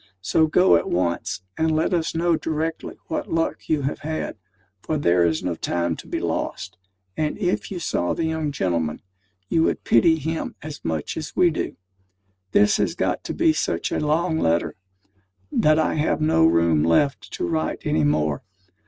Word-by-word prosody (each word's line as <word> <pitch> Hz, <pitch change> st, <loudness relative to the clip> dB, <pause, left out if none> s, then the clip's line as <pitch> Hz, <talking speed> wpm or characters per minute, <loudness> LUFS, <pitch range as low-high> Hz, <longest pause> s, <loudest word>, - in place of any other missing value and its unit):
So 160 Hz, +10 st, +3 dB
go 180 Hz, -, +5 dB
at 85 Hz, -, -3 dB
once, 90 Hz, +1 st, -1 dB, 0.2 s
and 160 Hz, 0 st, +2 dB
let 160 Hz, +4 st, +1 dB
us 165 Hz, -2 st, 0 dB
know 170 Hz, 0 st, +2 dB
directly 160 Hz, +1 st, -3 dB
what -, -, -4 dB
luck 165 Hz, 0 st, -1 dB
you 150 Hz, -3 st, +1 dB
have 140 Hz, -, -2 dB
had, 155 Hz, +1 st, -4 dB, 0.5 s
for 155 Hz, -, -2 dB
there 90 Hz, -11 st, +3 dB
is 80 Hz, -1 st, -1 dB
no 90 Hz, -, -1 dB
time 85 Hz, 0 st, -1 dB
to -, -, -11 dB
be -, -, -2 dB
lost; -, -, -3 dB, 0.4 s
and 155 Hz, -1 st, -1 dB
if 185 Hz, -3 st, -1 dB
you 190 Hz, -, -5 dB
saw 90 Hz, -, -1 dB
the 165 Hz, -, -2 dB
young 160 Hz, -2 st, -1 dB
gentleman, 85 Hz, -, -1 dB, 0.4 s
you 160 Hz, -, +2 dB
would -, -, 0 dB
pity 160 Hz, +8 st, +4 dB
him 160 Hz, +2 st, -3 dB
as 150 Hz, -1 st, -8 dB
much 80 Hz, -2 st, -3 dB
as 155 Hz, -1 st, -6 dB
we 175 Hz, -2 st, +4 dB
do. 160 Hz, -, -4 dB, 0.7 s
This 105 Hz, 0 st, +4 dB
has -, -, 0 dB
got -, -, -1 dB
to -, -, -3 dB
be 160 Hz, -, +3 dB
such 155 Hz, -, -1 dB
a -, -, 0 dB
long 160 Hz, +2 st, +1 dB
letter, 85 Hz, +1 st, +1 dB, 0.8 s
that 155 Hz, 0 st, +3 dB
I 155 Hz, -, +2 dB
have 155 Hz, +1 st, 0 dB
no 155 Hz, -, +4 dB
room 85 Hz, -2 st, +3 dB
left 130 Hz, -, +1 dB
to -, -, -2 dB
write 80 Hz, -2 st, -2 dB
any 80 Hz, -, +1 dB
more. 75 Hz, 0 st, +1 dB
150 Hz, 180 wpm, -23 LUFS, -, 0.8 s, go